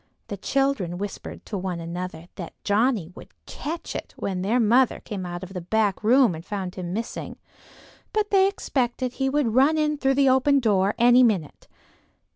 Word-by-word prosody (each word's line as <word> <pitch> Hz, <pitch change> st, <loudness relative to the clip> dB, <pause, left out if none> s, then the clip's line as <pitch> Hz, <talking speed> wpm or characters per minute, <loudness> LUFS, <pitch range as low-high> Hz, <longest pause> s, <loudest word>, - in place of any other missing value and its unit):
The 200 Hz, -, -4 dB
children 270 Hz, -6 st, 0 dB
whispered 200 Hz, +1 st, -7 dB
to 205 Hz, -, -4 dB
one 180 Hz, -2 st, -3 dB
another 170 Hz, 0 st, -6 dB
that 170 Hz, -3 st, -8 dB
Johnnie 205 Hz, -4 st, +1 dB
would -, -, -12 dB, 0.2 s
"catch 330 Hz, +3 st, -6 dB
it" -, -, -6 dB
when 185 Hz, -2 st, -3 dB
their 220 Hz, +6 st, +1 dB
mother 240 Hz, +3 st, +3 dB
came 190 Hz, -4 st, -6 dB
out 175 Hz, +1 st, -6 dB
of 185 Hz, +1 st, -9 dB
the 180 Hz, -, -4 dB
back 210 Hz, +3 st, 0 dB
room 240 Hz, -2 st, +5 dB
and 160 Hz, 0 st, -8 dB
found 190 Hz, -2 st, -4 dB
him 180 Hz, -2 st, -5 dB
missing; 225 Hz, +5 st, -5 dB, 0.7 s
but 425 Hz, -1 st, -1 dB
they 385 Hz, -1 st, +5 dB
expected 255 Hz, -, -2 dB
he 270 Hz, 0 st, -1 dB
would 270 Hz, -5 st, +1 dB
run 275 Hz, +6 st, +4 dB
in 300 Hz, -1 st, 0 dB
through 270 Hz, -1 st, +2 dB
the 275 Hz, 0 st, +4 dB
open 270 Hz, +2 st, +4 dB
door 205 Hz, -4 st, +2 dB
any 245 Hz, +1 st, +6 dB
minute. 200 Hz, -, 0 dB
220 Hz, 180 wpm, -24 LUFS, 185-270 Hz, 0.7 s, any